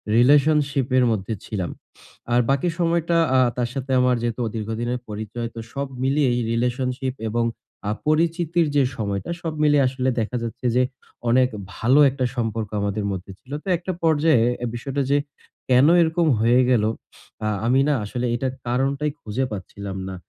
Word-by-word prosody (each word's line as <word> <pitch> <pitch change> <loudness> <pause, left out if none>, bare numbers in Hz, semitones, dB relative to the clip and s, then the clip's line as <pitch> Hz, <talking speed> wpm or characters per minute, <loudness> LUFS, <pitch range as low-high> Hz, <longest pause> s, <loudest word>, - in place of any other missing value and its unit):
রিলেশনশিপের 135 -1 +4
মধ্যে 105 +1 -2
ছিলাম। 95 -5 -3 0.6
আর 120 - +5
বাকি 140 +6 +2
সময়টা 170 0 +1 0.2
আ - - +5 0.2
তার 120 -1 0
সাথে 135 -1 -4
আমার 125 -1 +3
যেহেতু 120 +1 -2
দীর্ঘদিনের 115 +3 -3
পরিচয় 110 +3 -4
তো - - -6
সব 140 0 -2 0.2
মিলিয়েই 135 -3 +2
রিলেশনশিপ 125 +2 -1 0.2
এবং 115 +1 0 0.4
আ - - +1 0.2
পরিচিতির 165 +1 +2
যে 140 - +5
সময়টা 100 +5 -3
সব 165 -2 -3
মিলিয়ে 145 -2 +4
আসলে 130 0 -1
দেখা 115 +3 -2
যাচ্ছে 120 +2 -6
যে 125 - +4 0.5
অনেক 125 +1 +4 0.3
ভালো 130 +6 +3
একটা 130 -1 -2
সম্পর্ক 115 -3 -2
আমাদের 100 0 -1
মধ্যে 95 +1 -6
ছিল। 130 - -18
তো - - -14
একটা 185 +2 -4
পর্যায়ে 155 -6 +4 0.3
বিষয়টা 135 +3 -3
যে 145 - +5 0.5
কেন 130 +3 +6
এরকম 165 0 +2
হয়ে 120 +3 +4
গেল? 115 -4 +3 0.8
আমি 130 +3 +3
না 150 - +3
আসলে 125 +4 -3
এটার 130 +1 -2
কারণটাই 135 +4 0
খুঁজে 115 +5 -2
পাচ্ছিলাম 100 0 -6
না। 95 - -6
125 Hz, 155 wpm, -23 LUFS, 115-145 Hz, 0.8 s, কেন